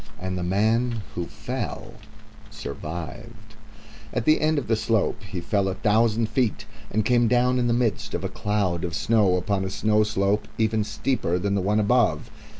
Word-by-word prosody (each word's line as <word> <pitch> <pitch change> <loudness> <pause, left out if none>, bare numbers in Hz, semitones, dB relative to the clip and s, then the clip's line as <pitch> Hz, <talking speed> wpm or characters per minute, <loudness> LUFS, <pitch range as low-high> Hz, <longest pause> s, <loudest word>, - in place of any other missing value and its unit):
And 95 0 -3
the 90 - -3
man 110 +5 +1
who 85 - -3
fell - - -5 0.6
survived. 95 +7 -8 0.6
At 120 - -2
the 155 - +4
end 155 0 +2
of 140 - -1
the 115 - +3
slope 110 +1 0
he 95 -3 -6
fell 100 +2 0
a 95 - -2
thousand 110 +2 +2
feet, 125 -3 -1 0.2
and 110 0 0
came 120 0 +3
down 125 +1 +3
in 120 - +1
the - - +2
midst 120 -3 -1
of - - -3
a - - 0
cloud 100 -4 -1
of 85 -3 -3
snow 105 -5 +3
upon 95 +2 0
a 95 - -2
snow 105 +2 +2
slope 105 0 +1
even 110 -1 +1
steeper 105 -4 -1
than 100 +2 -1
the 100 - +1
one 105 +3 +1
above. 115 +3 +2
105 Hz, 180 wpm, -25 LUFS, 95-115 Hz, 0.6 s, the